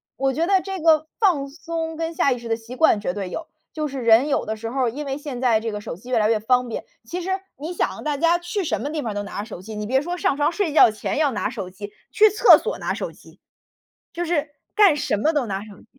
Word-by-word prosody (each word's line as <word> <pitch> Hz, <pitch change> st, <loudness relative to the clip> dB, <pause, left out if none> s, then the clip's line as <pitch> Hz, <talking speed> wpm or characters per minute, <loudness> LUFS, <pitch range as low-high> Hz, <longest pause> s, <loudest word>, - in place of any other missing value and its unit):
我 270 Hz, 0 st, 0 dB
觉 325 Hz, +5 st, 0 dB
得 385 Hz, -1 st, +4 dB
这 385 Hz, -1 st, -5 dB
个 315 Hz, -1 st, +4 dB
放 345 Hz, -11 st, +2 dB
松 325 Hz, +1 st, -5 dB
跟 330 Hz, +1 st, -3 dB
下 280 Hz, -, +2 dB
意 245 Hz, -, -1 dB
识 235 Hz, -, -9 dB
的 225 Hz, -, +1 dB
习 230 Hz, +2 st, -10 dB
惯 255 Hz, -7 st, +4 dB
绝 180 Hz, -, -2 dB
对 195 Hz, -3 st, -4 dB
有， 325 Hz, -, -6 dB, 0.3 s
就 305 Hz, -1 st, -2 dB
是 270 Hz, -2 st, -5 dB
人 230 Hz, +4 st, +5 dB
有 -, -, 0 dB
的 220 Hz, -, -3 dB
时 225 Hz, +1 st, -6 dB
候 255 Hz, -1 st, 0 dB
因 290 Hz, +5 st, -6 dB
为 270 Hz, +1 st, -2 dB
现 280 Hz, -4 st, -6 dB
在 235 Hz, -4 st, +3 dB
这 225 Hz, 0 st, -3 dB
个 210 Hz, 0 st, -5 dB
手 165 Hz, -, -6 dB
机 240 Hz, +8 st, -14 dB
越 240 Hz, -, +3 dB
来 215 Hz, 0 st, +2 dB
越 225 Hz, -, +2 dB
方 250 Hz, +3 st, +2 dB
便， 225 Hz, -, -5 dB, 0.2 s
其 345 Hz, +10 st, -5 dB
实 370 Hz, -, -5 dB, 0.3 s
你 320 Hz, +5 st, -5 dB
想 -, -, -2 dB
大 300 Hz, -1 st, -1 dB
家 335 Hz, +3 st, +3 dB
去 355 Hz, +3 st, -3 dB
什 -, -, -1 dB
么 290 Hz, -, -3 dB
地 310 Hz, -2 st, -2 dB
方 220 Hz, -3 st, -4 dB
都 205 Hz, -, -2 dB
拿 200 Hz, -, -6 dB
着 205 Hz, -, -3 dB
手 205 Hz, -6 st, -9 dB
机， 215 Hz, +3 st, -8 dB
你 210 Hz, 0 st, -4 dB
别 265 Hz, +2 st, +2 dB
说 350 Hz, +3 st, -3 dB
上 280 Hz, -, +1 dB
床 295 Hz, +3 st, +2 dB
睡 355 Hz, -3 st, -1 dB
觉 235 Hz, -, +7 dB
前 215 Hz, +6 st, -3 dB
要 295 Hz, -3 st, +2 dB
拿 215 Hz, -, -2 dB
手 205 Hz, -7 st, -6 dB
机， 205 Hz, +2 st, -9 dB, 0.2 s
去 430 Hz, 0 st, +6 dB
厕 425 Hz, +4 st, +7 dB
所 -, -, -3 dB
拿 -, -, -2 dB
手 -, -, -4 dB
机。 -, -, -19 dB, 0.7 s
就 345 Hz, -, -3 dB
是 310 Hz, -3 st, -1 dB, 0.2 s
干 400 Hz, -8 st, +6 dB
什 290 Hz, -7 st, -1 dB
么 310 Hz, +10 st, +1 dB
都 285 Hz, -6 st, 0 dB
拿 195 Hz, -1 st, -3 dB
手 210 Hz, -, -12 dB
机。 -, -, -21 dB
275 Hz, 300 characters per minute, -22 LUFS, 225-325 Hz, 0.7 s, 觉